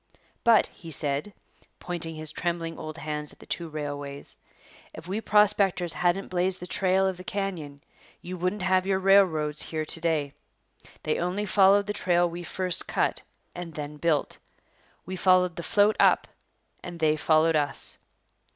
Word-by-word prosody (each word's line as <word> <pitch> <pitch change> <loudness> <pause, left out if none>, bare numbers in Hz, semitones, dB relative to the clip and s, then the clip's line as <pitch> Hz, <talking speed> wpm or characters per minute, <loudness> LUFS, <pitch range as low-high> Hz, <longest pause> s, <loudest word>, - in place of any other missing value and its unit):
'But,' 230 -2 +5
he 165 - -13
said, 145 +4 -2 0.5
pointing 165 -2 -4
his 155 0 -4
trembling 165 -1 -3
old 155 0 -7
hands 150 -2 0
at - - -15
the - - -15
two 170 -2 -4
railways, 145 -2 -5 0.6
'if 165 - -10
we 200 +4 -2
prospectors 200 -5 +3
hadn't 175 +2 0
blazed 185 +1 0
the 180 - -7
trail 190 +1 +1
of 190 -1 -1
the 185 - -9
canyon, 175 -8 -4 0.4
you 180 +1 -7
wouldn't 180 +3 -2
have 185 0 +2
your 195 -1 +2
railroads 185 -6 +3
here 155 -1 -3
to 165 - -2
day. 155 -4 0 0.7
They 155 - -1
only 180 +4 -1
followed 200 0 +4
the 210 - -3
trail 175 -3 +2
we 170 +1 -6
first 180 0 -1
cut - - 0 0.3
and 175 -3 -7
then 150 0 -6
built. 155 -2 0 0.7
We 185 - -5
followed 180 -1 +3
the - - -5
"float" 205 +4 +2
up - - +4 0.6
and 175 -1 -8
they 155 -1 +3
followed 155 +1 +3
us.' 145 -1 0
175 Hz, 160 wpm, -26 LUFS, 155-190 Hz, 0.7 s, But